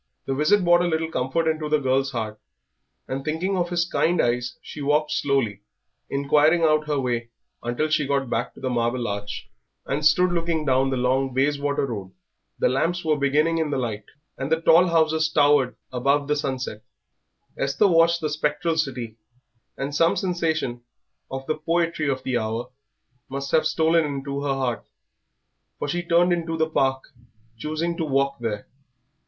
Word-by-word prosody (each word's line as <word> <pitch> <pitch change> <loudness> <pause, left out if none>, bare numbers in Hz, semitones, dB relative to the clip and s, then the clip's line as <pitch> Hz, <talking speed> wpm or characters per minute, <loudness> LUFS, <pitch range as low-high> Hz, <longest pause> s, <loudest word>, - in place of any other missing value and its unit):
The 135 - -1
visit 180 +9 +3
brought 175 0 +5
a 175 - +1
little 160 -1 -1
comfort 135 +6 0
into 155 -1 -1
the 150 - +4
girl's 135 -1 +1
heart; 110 -4 -4 0.7
and 135 +1 -4
thinking 165 +6 -1
of 175 -2 0
his 175 -1 +1
kind 175 -1 +1
eyes 120 0 0
she 150 - -9
walked 150 +2 +1
slowly, 120 -8 0 0.5
inquiring 150 +4 +3
out 155 -1 +3
her 145 -2 0
way 120 -3 -2 0.3
until 120 +6 -1
she 155 -2 +1
got 140 -1 0
back 120 0 -2
to - - -13
the 130 - -2
Marble 120 0 0
Arch, 100 0 -5 0.4
and 145 +3 -2
stood 175 +4 +4
looking 165 -2 -1
down 135 0 +2
the 130 - -1
long 130 +1 0
Bayswater 145 +1 +1
Road. 100 -7 -6 0.4
The - - +2
lamps 165 +7 0
were 155 -1 +3
beginning 150 +4 +2
in 160 -2 0
the 145 - -1
light, 110 -5 -3 0.3
and 135 +3 -3
the 160 - +3
tall 165 +2 +6
houses 160 -1 +2
towered 145 -4 +3 0.2
above 140 +3 +1
the 150 - +1
sunset. 130 -6 -3 0.7
Esther 140 +8 +2
watched 170 -1 +4
the 155 - -1
spectral 150 +2 -1
city, 125 -7 -3 0.6
and 140 +1 -3
some 165 +3 +3
sensation 160 -9 -1 0.5
of 135 0 -5
the 155 +2 -2
poetry 165 -1 0
of 130 -1 -2
the 125 -2 0
hour 115 +3 -3 0.6
must 140 0 -4
have 160 - +3
stolen 165 +1 +3
into 140 -1 -3
her 140 -1 0
heart, 130 -3 -2 0.9
for - - -3
she 175 +5 -1
turned 175 +1 +3
into 165 -1 -2
the 160 0 +2
Park, 135 -4 0 0.5
choosing 155 +7 -2
to - - -1
walk 140 -2 0
there. 110 -3 -4
145 Hz, 170 wpm, -24 LUFS, 130-160 Hz, 0.9 s, tall